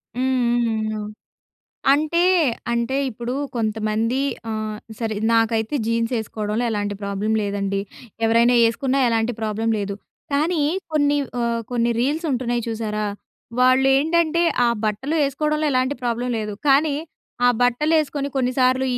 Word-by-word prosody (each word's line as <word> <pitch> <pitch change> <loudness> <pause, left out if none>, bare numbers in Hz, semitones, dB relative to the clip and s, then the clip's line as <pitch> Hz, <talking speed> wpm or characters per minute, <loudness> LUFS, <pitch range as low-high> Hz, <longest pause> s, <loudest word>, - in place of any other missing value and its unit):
హ్మ్ 260 0 +1 0.2
హ్మ్ 220 -1 -1
ఆ! - - -4 0.9
అంటే 310 +4 +2 0.5
అంటె 235 +3 0
ఇప్పుడు 240 +2 -5 0.2
కొంతమంది 220 +2 0 0.3
ఆహ్, 215 -1 -3 0.2
సరే 225 -2 -2 0.2
నాకైతే 225 +2 +1
జీన్స్ 230 +1 0
ఏ‌సుకోవడంలో 215 +1 -3
ఎలాంటి 205 -1 -2
ప్రాబ్లం 200 +2 -2
లేదండి. 200 -1 -1 0.4
ఎవరైనా 230 +2 +4
ఏ‌సుకున్నా 260 +4 0
ఎలాంటి 230 +1 +1
ప్రాబ్లమ్ 220 +1 -1
లేదు. 200 -1 -3 0.4
కానీ 310 +2 +1 0.3
కొన్ని 290 -1 +2 0.2
ఆహ్, 235 0 0
కొన్ని 235 -1 +1
రీల్స్ 300 +7 0
ఉంటున్నాయి 240 -2 -1
చూశారా, 215 -2 -2 0.5
వాళ్ళు 255 +1 +5
ఏంటంటే 330 +3 +2 0.2
ఆ - - +4 0.2
బట్టలు 215 +8 -1
ఏ‌సుకోవడంలో 300 +2 0
ఎలాంటి 255 +2 +1
ప్రాబ్లం 240 0 -1
లేదు. 210 -1 -3 0.2
కానీ 280 +2 +4 0.5
ఆ - - +7
బట్టలు 245 +6 +2
ఏ‌సుకొని 285 -1 -3
కొన్ని 255 -1 +1
సార్లు 255 +1 +3
235 Hz, 130 wpm, -22 LUFS, 220-270 Hz, 0.9 s, ఆ